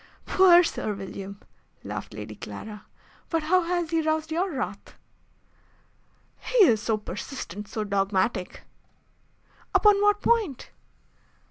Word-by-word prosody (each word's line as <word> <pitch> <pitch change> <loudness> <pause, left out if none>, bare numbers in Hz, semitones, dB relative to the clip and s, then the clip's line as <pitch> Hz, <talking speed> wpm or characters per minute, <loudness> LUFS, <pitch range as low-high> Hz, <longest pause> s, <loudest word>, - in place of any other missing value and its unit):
"Poor 360 -2 +6
Sir 215 -9 -2
William!" 195 0 -8 0.4
laughed - - -6
Lady - - -7
Clara. 210 -1 -9 0.4
"But 330 -2 0
how 365 +4 +3
has 345 -1 -2
he 330 -1 +2
roused 315 0 -1
your 360 +4 0
wrath?" 270 -3 -5 1.4
"He - - +4
is 225 -7 +3
so 220 0 0
persistent 210 -2 -7
so 215 +1 -3
dogmatic." 195 0 -1 1.1
"Upon 415 -1 +5
what 415 0 +3
point?" 425 - +1
310 Hz, 115 wpm, -26 LUFS, -, 1.4 s, Poor